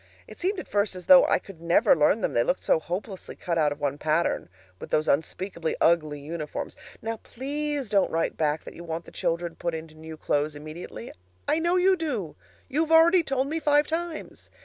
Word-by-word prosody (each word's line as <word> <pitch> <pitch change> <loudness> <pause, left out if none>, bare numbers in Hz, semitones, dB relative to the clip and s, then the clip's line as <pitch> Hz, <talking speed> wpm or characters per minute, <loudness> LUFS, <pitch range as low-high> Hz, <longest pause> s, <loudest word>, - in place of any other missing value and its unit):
It - - -13
seemed 380 +2 0
at - - -7
first 205 -1 0
as 180 - -8
though 275 -1 +8
I - - +4
could 185 -5 -12
never 170 +1 +4
learn 165 +8 +3
them, - - -1
they 120 - +3
looked 180 - 0
so - - +3
hopelessly 185 +4 -6
cut 170 -2 -2
out 150 -2 +3
of 145 - -5
one 145 0 -2
pattern, 155 - 0 0.3
with - - -8
those 155 - +1
unspeakably 170 +3 -1
ugly 155 -3 +2
uniforms. 150 +1 -5 0.3
Now 225 0 -3
please 285 +3 -4
don't 200 -2 +2
write 165 +1 -1
back 155 0 0
that - - -10
you 170 - -10
want 165 0 -5
the - - -13
children 170 0 -2
put 170 0 -3
into 160 0 -8
new 160 0 -10
clothes 150 0 0
immediately. 155 -5 -8 0.4
I 315 - +2
know 345 +2 +1
you 375 +1 +4
do; 255 - -3 0.3
you've 315 +3 0
already 335 +2 +7
told 270 -4 -1
me 315 +4 -2
five 295 -1 +3
times. 330 0 -5
175 Hz, 205 wpm, -26 LUFS, -, 0.4 s, though